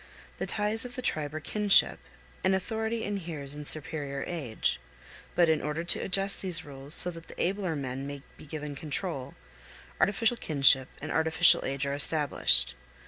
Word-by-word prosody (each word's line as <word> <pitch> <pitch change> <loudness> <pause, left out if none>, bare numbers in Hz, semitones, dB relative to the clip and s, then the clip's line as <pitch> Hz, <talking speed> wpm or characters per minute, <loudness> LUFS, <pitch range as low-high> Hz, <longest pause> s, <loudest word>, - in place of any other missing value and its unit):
The - - -3
ties 210 +1 +1
of 245 -1 -6
the 255 - -6
tribe 150 - -1
are - - -3
kinship, 205 +5 +4 0.4
and 190 0 +3
authority 220 +3 -3
inheres 165 -9 -4
in 150 0 -7
superior 145 -2 +1
age; 140 - -2 0.6
but 175 -1 +4
in 160 -1 +2
order 150 +2 -3
to 175 - +4
adjust 195 +1 0
these 180 -5 0
rules 140 +1 -3
so 180 - +3
that 165 -1 -12
the - - -12
abler 185 -2 -1
men 135 -1 -5
may 140 -1 -8
be - - -14
given 150 -1 -6
control, 145 -2 -4 0.6
artificial 225 +4 +2
kinship 135 - +3 0.2
and 155 - -4
artificial 160 +1 +3
age 140 +1 -2
are 140 - -2
established. 145 - +3
160 Hz, 165 wpm, -28 LUFS, 140-190 Hz, 0.6 s, kinship